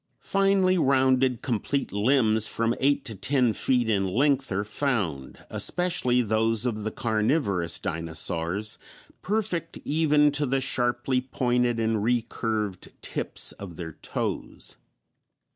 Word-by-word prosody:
Finely 195 -2 +2
rounded, 130 -3 +2
complete 130 +4 -1
limbs 110 0 +3
from 115 0 0
eight 140 +1 +2
to 115 - -4
ten 120 +4 +1
feet 125 -1 +1
in 100 -3 +1
length 135 +6 +1
are 100 +1 0
found, 105 - -2
especially 130 -9 +1
those 110 +1 +1
of 110 -4 -2
the 110 - -1
carnivorous 110 - 0
dinosaurs, 85 +4 -2 0.4
perfect 190 -5 -2
even 150 -1 +3
to 145 0 +1
the 135 +1 +1
sharply 125 0 0
pointed 125 -2 0
and 110 -1 0
recurved 110 -4 -1
tips - - -2
of 95 -4 -9
their 80 -1 -6
toes. - - -5
120 Hz, 120 wpm, -26 LUFS, 105-135 Hz, 0.4 s, limbs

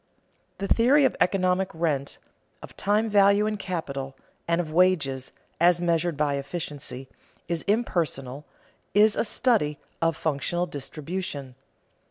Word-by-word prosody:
The 195 - -3
theory 270 +7 +4
of - - +1
economic 185 0 +2
rent, 150 -4 -1 0.5
of - - -11
time 210 +3 +1
value 200 0 +4
and 215 -1 -2
capital, 140 -8 -4 0.3
and 170 0 +1
of 160 -3 -3
wages, 155 -8 +2 0.3
as 175 +1 +4
measured 170 -2 0
by 145 -2 +1
efficiency, 140 -3 -5 0.4
is 170 -2 -2
impersonal, 155 - -1 0.5
is 210 +1 +5
a - - +1
study 210 - +1 0.2
of 165 -1 +1
functional 165 +3 -1
distribution. 145 -2 -5
170 Hz, 125 wpm, -26 LUFS, 145-195 Hz, 0.5 s, is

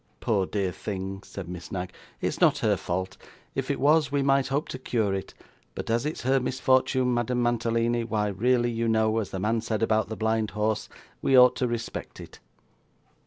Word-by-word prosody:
'Poor 100 -4 +1
dear 100 -3 -1
thing,' 95 +1 -5
said 100 -3 -8
Miss 90 -1 -8
Knag, 90 -1 -4 0.3
'it's - - -2
not - - +5
her - - +4
fault. 95 +2 -3 0.4
If - - -3
it - - -1
was, 150 0 +3
we 140 -1 +1
might 135 -1 +3
hope 140 +2 -1
to 130 - -5
cure 110 -6 0
it; 95 -1 -5 0.4
but - - -4
as 120 +5 +1
it's 155 - -4
her 135 +2 +3
misfortune, 130 0 +2
Madame 120 +1 0
Mantalini, 120 0 +1
why 105 -2 -1
really 120 +4 +1
you 115 0 -1
know, 110 -1 +2
as 105 - -3
the 95 - -5
man 110 +3 0
said 110 0 -2
about 110 -1 +1
the 110 - -4
blind 110 -1 0
horse, 110 0 0 0.3
we 135 - +4
ought 125 0 +7
to 125 - +1
respect 120 -1 -5
it. - - -11
115 Hz, 195 wpm, -27 LUFS, 105-125 Hz, 0.4 s, ought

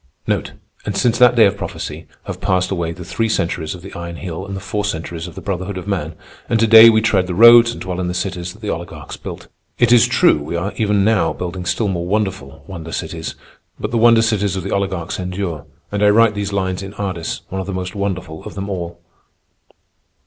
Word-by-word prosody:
And 100 -2 -4
since 120 0 +2
that 125 0 +6
day 115 -2 +7
of 100 0 +2
prophecy, - - -6 0.2
have - - -7
passed 90 -1 +1
away 85 -3 -1
the 85 +1 -9
three 115 +5 -1
centuries 85 -5 -1
of 90 - -12
the 100 - -10
Iron 85 0 -6
Heel 90 +2 -6
and 100 - -5
the - - -4
four 105 +2 -3
centuries 85 -3 -4
of 85 - -11
the - - -7
Brotherhood 95 0 -4
of 90 +1 -7
Man, 85 -6 -2 0.3
and 115 -1 +2
to 115 - +4
day 115 +1 +10
we 110 -1 +3
tread 95 -4 +2
the 90 - -3
roads 115 +2 +8
and - - -8
dwell 90 -1 -4
in 90 - -1
the 90 - -3
cities 90 -2 -3
that 110 +2 -18
the 105 - -3
oligarchs 85 +1 -7
built. - - -9 0.3
It 120 -1 +3
is 120 -2 +6
true, - - +4
we 75 - -5
are 90 +4 -2
even 105 -2 +1
now 105 -7 +2
building 90 0 -5
still 105 +5 0
more 85 -3 -2
wonderful 95 -8 -2
wonder 85 -4 -8
cities, - - -5 0.4
but 105 - -3
the 115 - +1
wonder 115 0 +6
cities 105 -3 0
of 95 - -3
the 100 - -3
oligarchs 95 -4 -2
endure, 90 -3 -4 0.2
and 105 0 -2
I 105 - +6
write 110 +1 +5
these 100 -1 -3
lines 95 -1 -1
in 100 +1 -8
Ardis, 95 -5 -4
one 95 0 -3
of 95 - -7
the - - -3
most 90 -1 -4
wonderful 95 -6 -4
of - - -8
them 100 +1 -4
all. 85 -2 -5
95 Hz, 230 wpm, -19 LUFS, 90-105 Hz, 0.4 s, day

